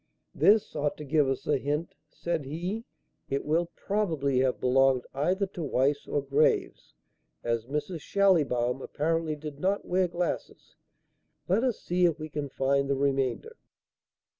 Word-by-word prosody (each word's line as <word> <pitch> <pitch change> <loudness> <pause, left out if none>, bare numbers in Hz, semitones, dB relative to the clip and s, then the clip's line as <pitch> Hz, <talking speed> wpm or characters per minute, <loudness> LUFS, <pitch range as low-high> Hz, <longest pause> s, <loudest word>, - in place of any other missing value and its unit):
"This 210 -3 +3
ought 145 -1 -1
to 150 - -7
give 145 -1 +2
us 135 - -2
a 145 -2 +2
hint," 150 +5 -2 0.2
said 165 -2 -3
he. 180 - -4 0.4
"It 140 0 -1
will 165 +3 +1
probably 160 -11 0
have 130 -1 +1
belonged 130 0 +3
either 180 +9 +1
to 185 -2 -8
Weiss 145 -1 0
or 145 - -1
Graves, 140 +2 +1 0.5
as 115 -1 -1
Mrs. 150 +4 -3
Schallibaum 140 -12 +2
apparently 160 +2 -1
did 150 -1 -8
not 195 +4 0
wear 185 0 +2
glasses. 175 0 -4 0.7
Let 195 +7 +2
us 250 -4 0
see 180 +1 +1
if 170 -2 +2
we 155 -1 -6
can 145 -1 -4
find 140 +1 +1
the 140 - +2
remainder." 135 -3 0
150 Hz, 150 wpm, -28 LUFS, 135-175 Hz, 0.7 s, This